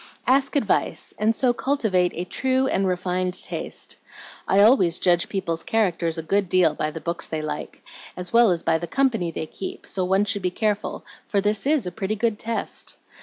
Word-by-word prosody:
"Ask 270 +2 +2
advice, 225 -8 0
and 220 +2 +2
so 250 0 +2
cultivate 220 -10 +1
a 175 - -3
true 260 +6 0
and 195 -7 +1
refined 180 0 -1
taste. - - -5 0.5
I 195 - +3
always 200 -6 +5
judge 175 -1 +2
people's 170 -4 -2
characters 175 -6 0
a 165 - -3
good 195 +3 +1
deal 185 -1 +4
by 155 - -2
the 160 - -7
books 170 +1 -3
they 155 -1 -3
like, 150 -1 -6 0.3
as 180 +3 -6
well 235 -1 +6
as 175 -2 0
by 160 - +2
the 170 - -5
company 225 -5 +1
they 160 - -4
keep; 190 - -7
so 190 - -2
one 190 +3 +2
should 205 -1 -1
be 180 - 0
careful, 210 +2 -2 0.2
for 200 - +1
this 210 +3 +1
is 295 -7 +2
a 180 - -3
pretty 195 +3 -2
good 220 0 0
test. 230 0 -4
195 Hz, 195 wpm, -24 LUFS, 175-225 Hz, 0.5 s, well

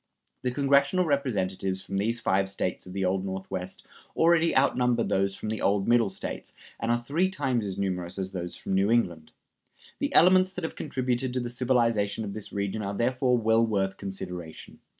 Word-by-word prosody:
The 125 - 0
congressional 140 +6 +3
Representatives 95 - -1
from 100 - -4
these 115 +4 0
five 95 -2 +1
States 95 -1 -3
of 90 - -9
the 95 0 -1
Old 95 +1 0
Northwest 95 -1 -5 0.3
already 165 -1 +4
outnumber 125 -3 +3
those 95 0 0
from 110 - -5
the 110 - -3
old 100 0 +1
Middle 120 -3 +4
States, 95 - -6 0.2
and 115 - -2
are 120 - +3
three 145 +10 0
times 130 - -1
as 95 - -5
numerous 90 -2 -3
as 95 -1 -3
those 90 -2 -5
from - - -5
New 95 +2 +3
England. 85 -9 +1 0.7
The - - -1
elements 185 +2 +6
that 185 - -6
have 160 - -4
contributed 130 -3 -2
to - - +2
the 120 -1 -3
civilization 115 -4 +1
of 100 - -5
this 105 0 -6
region 100 +1 -2
are 100 0 -3
therefore 125 +1 +2
well 115 0 +3
worth 95 -3 0
consideration. 90 -4 -7
110 Hz, 185 wpm, -27 LUFS, 95-130 Hz, 0.7 s, elements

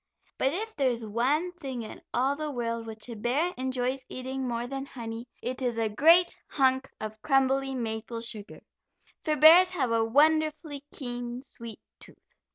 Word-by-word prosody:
But 265 - +3
if 435 +7 -4
there 275 -3 +2
is 235 -2 -3
one 265 +11 +1
thing 270 -9 -6
in 215 - -9
all 265 +3 +1
the 305 +1 -4
world 230 -3 -3
which 220 +1 -6
a 235 - -6
bear 265 +11 0
enjoys 260 0 -2
eating 260 +1 -4
more 235 0 -2
than 270 +2 -5
honey, 230 -2 -7 0.2
it 255 +2 -3
is 245 -3 -1
a 225 -1 +1
great 330 +11 +5
hunk 265 -1 +2
of 215 0 -6
crumbly 270 -1 +2
maple 230 -1 -4
sugar, 215 -3 -5 0.6
for 310 -2 +1
bears 330 +5 +8
have 280 -10 -1
a 230 -1 +3
wonderfully 305 +3 +2
keen 245 -1 -5
sweet 235 -4 -8 0.2
tooth. - - -18
260 Hz, 165 wpm, -28 LUFS, 235-285 Hz, 0.6 s, bears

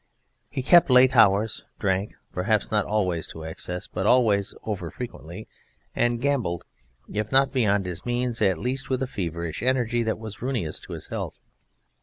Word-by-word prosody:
He 135 -2 -4
kept 175 +4 +6
late 130 +1 +6
hours, 110 -1 +4
drank 95 0 -1 0.2
perhaps 105 +3 0
not 105 -1 +2
always 90 -6 0
to 80 - -9
excess 90 +3 -5
but 95 +2 -3
always 105 -6 +3
over 100 -6 -4
frequently 95 -3 -8 0.5
and 120 0 +1
gambled, 125 - -1 0.4
if 105 +1 -3
not 135 0 +4
beyond 105 -6 +2
his 90 -2 -5
means, 120 -1 -1
at 95 -4 +3
least 130 +7 -3
with 130 0 0
a - - -2
feverish 85 - -4
energy 120 -1 +1
that 110 -1 -1
was 110 -2 -9
ruinous 115 -12 -2
to - - -10
his - - -7
health. - - -5
110 Hz, 165 wpm, -25 LUFS, 95-125 Hz, 0.5 s, kept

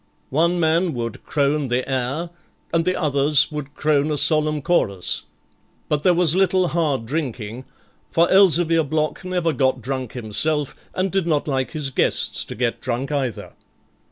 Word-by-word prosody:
One 170 +5 +2
man 165 0 +1
would 115 -2 -5
crone 145 0 0
the 125 +1 -1
air, 135 +6 -2 0.4
and 165 -1 +2
the 185 0 0
others 145 -1 +2
would 150 -1 -6
crone 150 -1 +1
a 150 - -1
solemn 155 -1 +3
chorus, 100 - 0 0.6
but 150 -1 0
there 180 +2 +3
was 170 -3 +4
little 185 -1 +2
hard 150 -7 -1
drinking, 125 -4 -4 0.4
for 170 +1 +3
Elzevir 175 -4 +5
Block 155 +3 -2
never 180 -3 -1
got 130 0 +1
drunk 130 0 -4
himself, 140 +6 -1 0.2
and 185 0 -1
did 190 -3 0
not 150 -3 0
like 135 0 -2
his 150 -4 -2
guests - - +1
to - - -8
get 120 0 -2
drunk 130 +2 -3
either. 135 -6 -3
150 Hz, 155 wpm, -21 LUFS, 130-165 Hz, 0.6 s, Elzevir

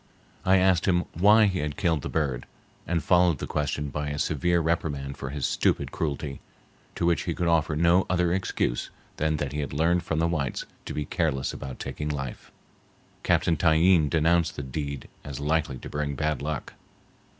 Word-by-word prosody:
I 95 +1 +5
asked 95 -2 +3
him 90 -2 +2
why 105 +5 +6
he 95 -3 0
had 75 -1 -3
killed 80 -5 +1
the - - -5
bird, 70 -6 -1 0.4
and 85 -3 0
followed 90 -2 +4
the - - -4
question 75 0 -2
by 75 +1 -3
a 75 - -3
severe 85 +4 +1
reprimand 75 -4 -1
for 65 - -6
his 70 -2 -3
stupid - - +1
cruelty, 70 -2 -3 0.6
to 85 - -1
which 85 -1 +2
he 85 - -2
could 90 - -1
offer 80 -2 +2
no 85 +4 +3
other 90 -1 +2
excuse 90 -9 -1 0.3
than 75 0 +1
that 70 -2 -3
he 75 - -2
had 70 - -3
learned 85 +4 +2
from 80 -2 -2
the 80 +1 +2
whites 75 -6 -2 0.2
to - - -5
be 75 - -2
careless 75 -6 -1
about 65 -2 -7
taking 75 - -4
life. 70 -4 -5 0.7
Captain 85 - +2
Tyeen 80 0 +4
denounced 85 +1 +2
the 70 - -5
deed 70 0 -5 0.2
as 70 -2 -6
likely 75 -2 0
to - - -9
bring 75 -1 -3
bad 75 -1 -1
luck. 75 +1 -4
80 Hz, 185 wpm, -26 LUFS, 70-85 Hz, 0.7 s, why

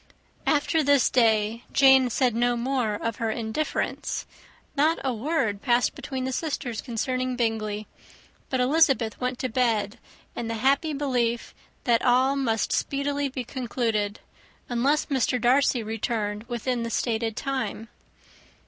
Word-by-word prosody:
After 310 +2 +2
this 285 -2 +3
day, 225 -1 +2
Jane 265 -2 +6
said 245 0 +1
no 240 +1 +1
more 240 -3 0
of 230 +1 -3
her 225 - -1
indifference. 225 +7 -2 0.5
Not 310 +3 +3
a 265 -2 0
word 225 -5 -1
passed 245 -2 +2
between 260 -2 -5
the 260 - -2
sisters 255 -6 -3
concerning 255 +1 -2
Bingley; 215 -3 -1 0.6
but 260 - 0
Elizabeth 260 -4 +2
went 250 0 -1
to 255 - -2
bed 230 -3 0 0.4
in 235 - -4
the 230 - -2
happy 280 +6 +2
belief 245 -5 -1 0.3
that 235 -2 +3
all 255 +3 +3
must 230 -6 0
speedily 285 0 -1
be 260 -1 -4
concluded, 230 -5 -2 0.5
unless 270 +5 +1
Mr. 260 -3 0
Darcy 250 0 +3
returned 215 -1 -3
within 240 +1 -2
the 230 - -3
stated 225 -1 -1
time. 265 -4 -3
245 Hz, 135 wpm, -26 LUFS, 225-270 Hz, 0.6 s, Jane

